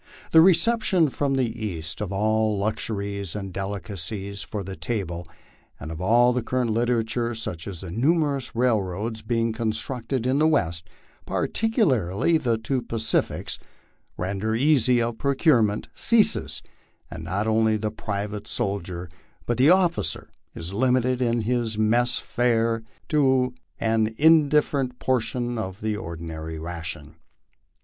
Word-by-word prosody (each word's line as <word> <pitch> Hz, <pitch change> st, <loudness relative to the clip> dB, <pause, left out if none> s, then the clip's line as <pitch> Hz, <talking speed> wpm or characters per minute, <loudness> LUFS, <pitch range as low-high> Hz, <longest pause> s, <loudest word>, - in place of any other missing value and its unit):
The 160 Hz, -, +8 dB
reception 185 Hz, -1 st, +4 dB
from 135 Hz, +1 st, -1 dB
the 130 Hz, -1 st, +2 dB, 0.2 s
East 80 Hz, -5 st, -4 dB
of 100 Hz, -3 st, -3 dB
all 110 Hz, +1 st, +1 dB
luxuries 100 Hz, -2 st, -3 dB
and 95 Hz, -3 st, -5 dB
delicacies 100 Hz, 0 st, -4 dB
for 105 Hz, -2 st, -5 dB
the 95 Hz, +1 st, -6 dB
table 90 Hz, -8 st, -4 dB, 0.5 s
and 80 Hz, +2 st, -7 dB
of 80 Hz, +1 st, -6 dB
all 120 Hz, +5 st, +4 dB
current 125 Hz, -1 st, -1 dB
literature, 115 Hz, 0 st, 0 dB
such 90 Hz, -7 st, -3 dB
as 95 Hz, -4 st, -6 dB
the 95 Hz, -3 st, -7 dB
numerous 140 Hz, -, +1 dB
railroads 110 Hz, -2 st, 0 dB
being 115 Hz, 0 st, 0 dB
constructed 115 Hz, +2 st, -2 dB
in 130 Hz, +3 st, +2 dB
the 155 Hz, -, +4 dB
West, 85 Hz, -, 0 dB, 0.4 s
particularly 160 Hz, -, +1 dB
the 120 Hz, -5 st, +1 dB
two 125 Hz, +4 st, -2 dB
Pacifies, 115 Hz, -1 st, -1 dB, 0.6 s
render 100 Hz, +4 st, -2 dB
easy 130 Hz, -2 st, +3 dB
of 115 Hz, -1 st, -2 dB
procurement, 130 Hz, -, +2 dB
ceases; 230 Hz, -2 st, +3 dB, 0.5 s
and 80 Hz, -, -7 dB
not 95 Hz, +5 st, -2 dB
only 110 Hz, 0 st, +2 dB
the 105 Hz, 0 st, -2 dB
private 105 Hz, -1 st, -4 dB
sol 100 Hz, 0 st, -1 dB
dier 90 Hz, 0 st, -7 dB, 0.4 s
but 120 Hz, -, -1 dB
the 135 Hz, +4 st, +6 dB
officer 175 Hz, -, +2 dB, 0.3 s
is 85 Hz, +3 st, -5 dB
limited 125 Hz, +2 st, +2 dB
in 120 Hz, -1 st, +1 dB
his 115 Hz, -1 st, -1 dB
mess 120 Hz, +3 st, +2 dB
fare 115 Hz, -2 st, +1 dB, 0.3 s
to 130 Hz, -4 st, +3 dB, 0.3 s
an 110 Hz, -1 st, +1 dB
indifferent 150 Hz, -4 st, +3 dB
portion 120 Hz, -1 st, -1 dB
of 95 Hz, -2 st, -5 dB
the 110 Hz, -1 st, -1 dB
ordinary 80 Hz, -4 st, -6 dB
ration. 80 Hz, -2 st, -6 dB
110 Hz, 130 wpm, -24 LUFS, 100-125 Hz, 0.6 s, The